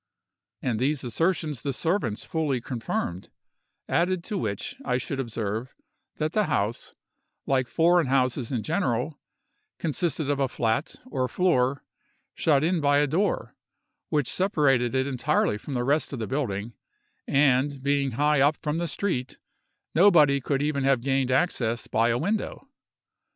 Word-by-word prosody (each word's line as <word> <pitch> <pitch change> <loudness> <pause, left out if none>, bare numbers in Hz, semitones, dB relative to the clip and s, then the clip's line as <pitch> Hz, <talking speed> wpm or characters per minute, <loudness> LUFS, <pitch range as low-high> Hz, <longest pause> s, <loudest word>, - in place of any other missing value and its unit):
And 120 -5 0
these 140 +2 0
assertions 155 +1 -1
the 140 - -2
servants 150 - -1
fully 155 -6 -1
confirmed; 115 -7 -4 0.6
added 175 +1 +1
to 210 - -4
which, 100 -4 -3
I 125 -2 0
should 135 +2 -4
observe, 115 0 -3 0.4
that 155 +1 -2
the 215 -1 +2
house, 115 - -2 0.5
like 130 -2 +1
foreign 170 0 +3
houses 130 -1 +1
in 120 -5 -1
general, 145 - -1 0.6
consisted 160 -1 -1
of 145 -1 0
a 135 - +2
flat, 115 +3 -1
or 130 - -1
floor, 135 -4 +1 0.5
shut 145 -3 +2
in 170 0 +1
by 145 0 +3
a 145 - +4
door, 170 +9 -1 0.5
which 150 -5 +1
separated 135 - +2
it 130 0 +2
entirely 125 -5 0
from 135 +5 -6
the 120 - 0
rest 145 +5 +1
of - - -3
the 110 - -3
building, 115 -5 -3 0.5
and, 135 0 +2
being 140 -2 +1
high 150 +3 +2
up 145 +2 +4
from 150 +2 -2
the 170 - -1
street, 140 -6 -3 0.6
nobody 155 -6 +5
could 140 +2 -1
even 145 -2 0
have 135 -3 +3
gained 135 0 +1
access 125 -6 0
by 115 +1 +1
a 115 - +2
window. 210 - -2
140 Hz, 150 wpm, -26 LUFS, 125-155 Hz, 0.6 s, nobody